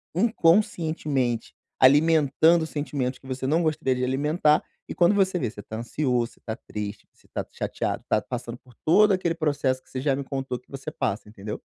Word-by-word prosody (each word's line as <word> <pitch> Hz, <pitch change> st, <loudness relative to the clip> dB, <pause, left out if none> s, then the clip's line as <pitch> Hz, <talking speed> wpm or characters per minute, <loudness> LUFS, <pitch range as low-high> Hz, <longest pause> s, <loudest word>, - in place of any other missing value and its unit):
inconscientemente 160 Hz, -, +1 dB, 0.3 s
alimentando 160 Hz, +3 st, +5 dB
sentimentos 140 Hz, -4 st, -3 dB
que 135 Hz, -, -15 dB
você 130 Hz, 0 st, -4 dB
não 160 Hz, +4 st, +2 dB
gostaria 155 Hz, -4 st, +1 dB
de 125 Hz, -, -2 dB
alimentar, 150 Hz, +4 st, +2 dB, 0.2 s
e -, -, -5 dB
quando 175 Hz, +3 st, +4 dB
você 190 Hz, -2 st, +2 dB
vê, 125 Hz, -7 st, -1 dB
você 105 Hz, -, -10 dB
tá 110 Hz, -, -7 dB
ansioso, 120 Hz, 0 st, -1 dB
você -, -, -25 dB
tá 110 Hz, -, -3 dB
triste, 105 Hz, -3 st, -7 dB
você -, -, -27 dB
tá -, -, -2 dB
chateado, -, -, -3 dB
tá -, -, +3 dB
passando 120 Hz, -1 st, -6 dB
por 125 Hz, -1 st, -21 dB
todo 210 Hz, +6 st, +6 dB
aquele 180 Hz, -3 st, 0 dB
processo 145 Hz, -5 st, 0 dB
que -, -, -28 dB
você 130 Hz, -, -4 dB
já 140 Hz, -1 st, +2 dB
me 140 Hz, -, -4 dB
contou 135 Hz, -2 st, -4 dB
que -, -, -34 dB
você 135 Hz, +2 st, -6 dB
passa, 115 Hz, -9 st, -2 dB
entendeu? 105 Hz, -1 st, -7 dB
140 Hz, 190 wpm, -25 LUFS, 125-160 Hz, 0.3 s, todo